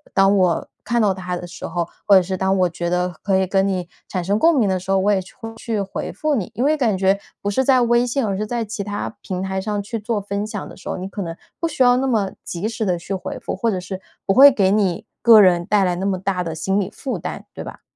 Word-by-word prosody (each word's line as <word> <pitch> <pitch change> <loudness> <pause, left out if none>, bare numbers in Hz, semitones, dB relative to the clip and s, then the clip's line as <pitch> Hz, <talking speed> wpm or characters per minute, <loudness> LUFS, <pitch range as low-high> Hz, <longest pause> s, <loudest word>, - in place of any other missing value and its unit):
当 195 +1 +5
我 185 -3 +2 0.2
看 240 0 0
到 210 -4 +3
它 180 -1 -4
的 175 - -7
时 175 +1 -8
候， 170 -2 -2 0.2
或 200 - +7
者 190 - +6
是 190 +1 -3
当 190 +1 +1
我 180 -1 +3
觉 170 +1 -3
得 180 +1 0
可 195 -1 +1
以 190 - +2
跟 195 +1 +1
你 185 -3 -2 0.2
产 185 -2 -3
生 200 +4 +1
共 330 +2 +4
鸣 220 - +3
的 190 -1 0
时 185 - -12
候， 195 - +3
我 195 +2 +2
也 195 -2 +2
去 190 +4 -15
会 225 -1 -7
去 225 -1 -3
回 195 0 -4
复 310 -1 -1
你， 215 -10 -2
因 245 - -1
为 300 +3 +3
感 235 -9 +1
觉 195 +1 +2 0.2
不 205 - 0
是 260 +6 +1
在 260 -1 +4
微 240 +1 +3
信， 250 +1 0
而 200 -2 -1
是 210 +2 -3
在 235 0 -2
其 205 -1 -4
他 205 +2 -4
平 185 -1 -4
台 190 0 -2
上 205 0 -2
去 225 +3 -4
做 215 +1 -2
分 200 +1 -3
享 210 -2 -5
的 - - -11
时 - - -9
候， - - -2
你 185 +1 -5
可 200 +1 -6
能 165 -2 -5 0.2
不 335 - 0
需 300 -5 +1
要 245 0 +5
那 265 +1 0
么 215 -6 +1
及 180 +4 -4
时 225 0 -3
地 180 -3 +1
去 175 +3 -6
回 190 - -4
复， - - -4
或 230 +5 0
者 190 -4 -1
是， 185 +1 -7 0.2
不 195 - +2
会 275 +6 +10
给 195 -7 +2
你 200 -1 +1 0.2
个 230 -2 +8
人 180 -4 +5
带 205 +2 +2
来 180 -1 +1
那 190 +2 -1
么 195 -2 0
大 185 -1 -1
的 165 -2 -4
心 190 +5 0
理 195 - -2
负 265 - -5
担， - - -6
对 - - -7
吧？ - - -10
195 Hz, 310 characters per minute, -21 LUFS, 185-225 Hz, 0.2 s, 会